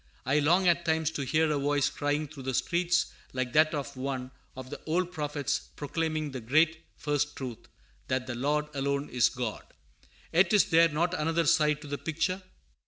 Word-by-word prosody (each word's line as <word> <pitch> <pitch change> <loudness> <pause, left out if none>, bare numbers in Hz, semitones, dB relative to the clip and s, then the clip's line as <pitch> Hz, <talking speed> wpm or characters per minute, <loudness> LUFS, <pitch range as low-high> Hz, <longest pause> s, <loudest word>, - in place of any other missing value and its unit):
I 135 +4 +3
long 175 +6 +3
at 170 0 +3
times 160 -1 +1
to 160 - -4
hear 155 +3 +2
a 145 - +1
voice 145 0 +2
crying 145 +1 -1
through 145 -1 -11
the 130 -1 -2
streets 175 +4 +1 0.2
like 130 -1 -2
that 155 0 +4
of 140 -1 -4
one 130 -1 -4 0.2
of 130 +1 -9
the - - -7
old 175 +3 0
prophets 145 -4 -2
proclaiming 155 +1 -2
the 130 -2 -6
great 155 +7 +2
first 145 0 -1
truth, 125 -4 -7 0.4
that 130 0 -1
the 130 - -4
Lord 145 +5 0
alone 140 +1 -1
is 120 -2 +4
God. 120 -4 -4 0.7
Yet 180 +6 +4
is 205 - +6
there 165 +1 +6
not 170 +4 0
another 165 0 +1
side 150 -1 +3
to - - -9
the 145 0 -4
picture? 185 +4 -1
150 Hz, 185 wpm, -29 LUFS, 135-160 Hz, 0.7 s, is